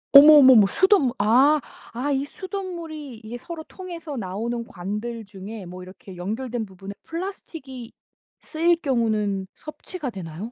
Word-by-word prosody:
어머머머 275 -7 +10
수돗물 375 - +3
아 260 +9 +5 0.3
아 265 +5 -2
이 275 0 0
수돗물이 335 - -7
이게 235 +3 -6
서로 330 +3 -8
통해서 340 -5 -8
나오는 230 +3 -3
관들 210 +5 -5
중에 200 +1 -9
뭐 180 +1 -9
이렇게 185 0 -12
연결된 225 +5 -3
부분에 195 +1 -9
플라스틱이 320 - -7 0.5
쓰일 335 +2 +2
경우는 215 -7 0
섭취가 305 -2 -7
되나요? 185 +3 -7
240 Hz, 310 characters per minute, -24 LUFS, 205-310 Hz, 0.5 s, 어머머머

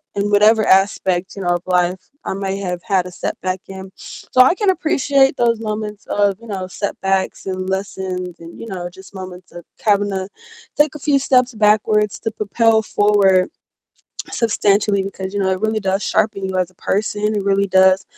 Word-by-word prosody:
in 200 +1 0
whatever 215 +1 +4
aspect, 190 -1 +2
you 195 - -6
know, 175 - -1
of 175 - -5
life 180 0 0
I - - -2
may 195 0 -3
have 180 -3 -4
had 190 -4 0
a - - -9
setback 185 +1 -4
in. 190 0 -9
So, 255 - 0
I 260 - +6
can 410 -1 +1
appreciate 280 -6 +2
those 235 -2 +2
moments 210 -1 -5
of, 200 -2 +1
you 230 - -14
know, 190 -3 -4
setbacks 195 -1 -2
and 185 0 -3
lessons 190 -2 -4
and, 165 0 -12
you 230 - -8
know, 180 -3 -5
just 190 +2 -15
moments 185 -1 -9
of 175 -1 -11 0.2
having 205 -2 +2
to 190 -1 -3 0.5
take 295 -1 +3
a - - -7
few 285 -1 +2
steps 255 -2 +2
backwards 210 -1 +2
to 225 - -3
propel 220 +1 +2
forward 200 -2 +3 0.8
substantially 205 -3 +1
because, 190 0 -6
you 200 - -1
know, 190 - +1
it 185 0 -1
really 220 0 0
does 195 +1 -1
sharpen 200 -2 0
you 190 - -3
as 185 -1 0
a - - -27
person, 210 +1 -1
it 200 - -2
really 200 0 +2
does 190 0 +4
200 Hz, 190 wpm, -19 LUFS, 190-215 Hz, 0.8 s, I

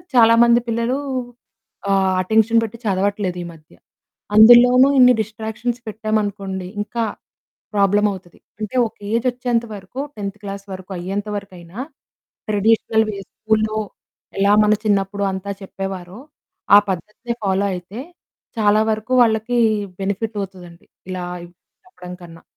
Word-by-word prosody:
చాలా 230 -1 +7
మంది 235 0 +5
పిల్లలు 230 +3 0 0.9
ఆహ్, 190 -1 +2
అటెన్షన్ 220 +4 +3
పెట్టి 225 +1 -6
చదవట్లేదు 195 -1 -1
ఈ - - -7
మధ్య. 155 -1 -20 0.6
అందులోనూ 245 +4 +8
ఇన్ని 250 -1 +7
డిస్ట్రాక్షన్స్ 220 +3 -4
పెట్టామనుకోండి, 205 -3 -3
ఇంకా 230 +2 -3 0.7
ప్రాబ్లమ్ 205 +1 +3
అవుతది. 180 -2 -13 0.2
అంటే 215 +3 -5
ఒక - - -17 0.2
ఏజ్ 230 +2 0
వచ్చేంత 245 -1 -1
వరకు, 200 +7 -9 0.2
10థ్ 200 0 -5
క్లాస్ 200 0 -7
వరకు 190 +1 -10
అయ్యేంత 195 +4 -4
వరకైనా 185 -1 -11 0.7
ట్రెడిషనల్ 220 +1 +2
వే 200 - -4
స్కూలులో 215 0 -1 0.6
ఎలా 200 +1 +4
మన 210 - +4
చిన్నప్పుడు 200 0 0
అంతా 190 +1 -4
చెప్పేవారో, 195 0 -7 0.6
ఆ - - +11
పద్ధతిని 210 +6 -4
ఫాలో 195 0 +1
అయితే 185 +5 -8 0.6
చాలా 210 0 +4
వరకు 220 +4 -3
వాళ్ళకి 225 +1 +1 0.4
బెనిఫిట్ 205 +3 -3
అవుతదండి 180 -3 -10 0.2
ఇలా 180 -1 -4 0.6
చెప్పడం 180 -1 -11
కన్నా. 165 -1 -13
205 Hz, 120 wpm, -20 LUFS, 190-225 Hz, 0.9 s, ఆ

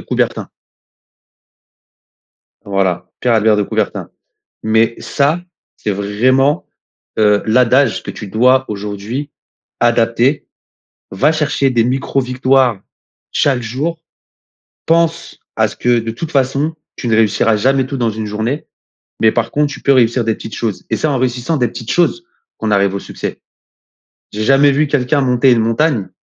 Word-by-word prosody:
Coubertin. - - -2 2.2
Voilà, 95 -3 -1
Pierre 125 - +1
Albert 110 -1 +3
de 105 - +1
Coubertin. - - -3 0.5
Mais 110 +1 +2
ça, 150 +4 0 0.4
c'est 105 - -3
vraiment, 130 - +1 0.5
heu, 105 -1 +3
l'adage 125 +2 +3
que - - -6
tu 105 - -8
dois 125 +5 +3
aujourd'hui 105 +7 -5 0.5
adapter, 120 +4 +2 0.7
va 135 +11 +2
chercher 150 -3 0
des 120 -3 +2
micro-victoires 130 -2 +1 0.5
chaque 130 -4 +1
jour, 145 +9 -3 0.9
pense 165 0 0 0.2
à 110 0 +2
ce - - -10
que, 120 -1 +2
de 115 0 -4
toute 160 +8 -6
façon, 140 +3 0 0.2
tu 125 - -5
ne 115 - +2
réussiras 110 0 +2
jamais 130 +5 +2
tout 135 +1 -5
dans 120 -2 +1
une 110 0 -4
journée, 110 +8 -3 0.5
mais 110 - +5
par 115 -1 -1
contre, 145 +1 0
tu - - -9
peux 140 - +3
réussir 120 -2 +3
des 115 - 0
petites 110 - -9
choses. 110 -4 -3
Et - - +1
c'est - - -1
en 140 -3 0
réussissant 125 +5 -1
des 125 -4 +1
petites 115 +1 -8
choses 175 - +1 0.3
qu'on 110 - -2
arrive 100 -1 +2
au - - -1
succès. - - -6 0.9
J'ai 105 +1 -3
jamais 135 +3 +5
vu 150 +2 +2
quelqu'un 140 0 +1
monter 130 0 +3
une 120 - +3
montagne 115 -1 0
125 Hz, 150 wpm, -16 LUFS, 110-140 Hz, 2.2 s, mais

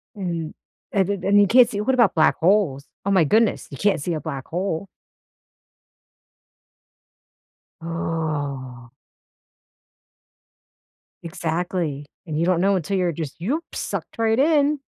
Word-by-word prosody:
And 170 -5 -4 0.4
and 195 -2 +1
and 205 +1 +5
you 200 - +4
can't 240 +3 +6
see 205 -2 -3
what 265 +5 +1
about 235 -7 +3
black 155 - +4
holes? 165 -7 +2 0.2
Oh 200 - +1
my 190 -4 +5
goodness, 220 +8 +2
you - - -7
can't 205 -7 +1
see 170 +4 -2
a 155 - -3
black 135 -1 -6
hole. 180 +1 -3 2.9
Oh. 145 -7 -4 2.3
Exactly. 165 -2 -3 0.2
And 155 -3 -4
you 165 - +1
don't 180 -1 +2
know 195 +1 +3
until 190 +2 -1
you're 180 -2 +1
just, 155 -2 -6
"Yoop," 260 - -1
sucked - - -5
right 225 0 +2
in. 295 0 +3
175 Hz, 130 wpm, -22 LUFS, 155-205 Hz, 2.9 s, can't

